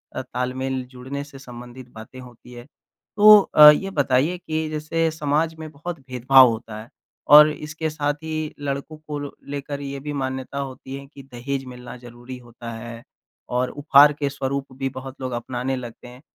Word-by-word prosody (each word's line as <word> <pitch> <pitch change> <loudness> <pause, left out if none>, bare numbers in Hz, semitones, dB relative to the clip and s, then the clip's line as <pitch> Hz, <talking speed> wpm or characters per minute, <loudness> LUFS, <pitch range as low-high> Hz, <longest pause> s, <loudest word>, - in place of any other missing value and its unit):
अ, - - -2
तालमेल 130 +1 -3
जुड़ने 130 +3 -6
से 145 -1 -13
संबंधित 125 -1 -11
बातें 110 +3 -12
होती 125 -1 -14
हैं। 120 0 -11 0.5
तो 210 0 +9 0.2
अ, 150 0 +11
ये 170 +6 +3
बताइए 140 +6 +2
कि 160 -2 -3
जैसे 155 +2 -1
समाज 155 +1 -1
में 160 -1 -7
बहुत 160 +3 -7
भेदभाव 130 0 +5
होता 110 -1 -6
है 115 - -14 0.4
और 150 +1 +10
इसके 155 +1 -5
साथ 145 -1 -1
ही 155 -1 -4
लड़कों 140 +2 -5
को 155 -1 -7 0.3
लेकर 145 0 -5
ये 140 0 -6
भी 145 - -3
मान्यता 130 +1 -5
होती 135 -1 -7
है 140 0 -9
कि 140 - -12
दहेज़ 135 +1 -5
मिलना 125 -1 -10
ज़रूरी 120 +1 -11
होता 120 -1 -10
है 115 +1 -8 0.5
और 125 +1 0
उपहार 145 0 +5
के 145 -1 -2
स्वरूप 140 -1 -4
भी 135 0 -2
बहुत 135 0 -10
लोग 130 -1 -4
अपनाने 125 +2 -3
लगते 120 -1 -9
हैं। 125 +1 -14
135 Hz, 175 wpm, -22 LUFS, 125-150 Hz, 0.5 s, अ